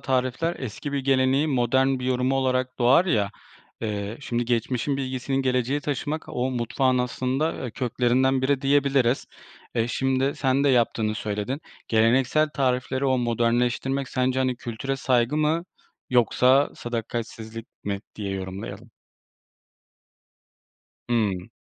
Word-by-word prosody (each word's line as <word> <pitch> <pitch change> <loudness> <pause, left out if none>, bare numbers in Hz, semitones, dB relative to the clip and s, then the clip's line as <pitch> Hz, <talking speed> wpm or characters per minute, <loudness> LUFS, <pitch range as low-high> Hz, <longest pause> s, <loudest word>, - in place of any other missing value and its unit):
tarifler 130 +6 0
eski 130 +4 -5
bir 140 - 0
geleneğin 135 +2 +2
modern 130 +1 +2
bir 125 - -5
yorumu 130 +1 +1
olarak 130 -1 0
doğar 130 +8 +5
ya, 105 - +1 0.5
eee, 105 -1 -3
şimdi 120 -3 -2
geçmişin 120 +3 0
bilgisinin 130 0 -2
geleceğe 130 +2 +1
taşımak 145 +2 -3
o 125 +1 -1
mutfağın 125 +1 +1
aslında, 130 +5 0
eee, 125 - -4
köklerinden 130 +2 +1
biri 135 0 +2
diyebiliriz. 135 -2 +2 0.5
Eee, 115 -1 +1
şimdi 135 +2 0
sen 135 +1 +1
de - - +4
yaptığını 115 -4 +2
söyledin, 110 +7 -3 0.3
geleneksel 125 +7 +3
tarifleri 130 0 0
o 130 -1 +2
modernleştirmek 120 +3 0
sence, 130 0 0
hani, 130 -1 +1
kültüre 120 +4 -4
saygı 125 +1 +1
mı 155 +2 +1 0.5
yoksa 125 +3 +4
sadakatsizlik 115 -1 -5 0.2
mi 100 -1 -2
diye 100 -2 -4
yorumlayalım? 100 +4 -6 2.2
Hımm. 100 -6 0
130 Hz, 120 wpm, -25 LUFS, 120-135 Hz, 2.2 s, doğar